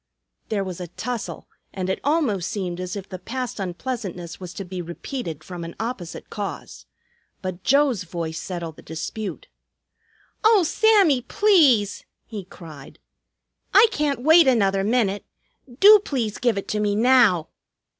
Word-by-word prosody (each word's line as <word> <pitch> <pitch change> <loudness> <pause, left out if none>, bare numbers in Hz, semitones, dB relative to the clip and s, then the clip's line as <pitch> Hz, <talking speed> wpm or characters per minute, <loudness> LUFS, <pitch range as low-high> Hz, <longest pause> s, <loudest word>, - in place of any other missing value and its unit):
There 205 -3 0
was 185 -2 -6
a 180 - -5
tussle, 235 +7 -5 0.2
and 185 -1 -4
it 190 - -1
almost 275 - 0
seemed 180 -4 -4
as 185 +1 -4
if 200 -2 -6
the 185 - -8
past 250 +5 -5
unpleasantness 185 -2 -5
was 180 -2 -8
to 195 - -6
be 180 0 -5
repeated 170 - -6
from 175 -2 -7
an 165 0 -8
opposite 220 -7 -6
cause. 205 -2 -6 0.6
But 185 -1 -5
Joe's 275 -5 +3
voice 165 -2 -5
settled 170 -3 -6
the - - -12
dispute. 200 - -6 1.0
"Oh, 430 -3 +5
Sammy, 385 - +4
please!" 280 - +3 0.2
he 210 -5 -7
cried. 155 -6 -12 0.8
"I 415 +4 +9
can't 290 - -1
wait 320 +1 +7
another 195 -6 +3
minute. 205 -2 +1 0.6
Do 420 +1 +9
please 245 - -3
give 240 -4 +1
it 200 - -4
to 215 - -1
me 205 -1 +1
now!" 225 -8 +4
205 Hz, 145 wpm, -23 LUFS, 180-260 Hz, 1.0 s, I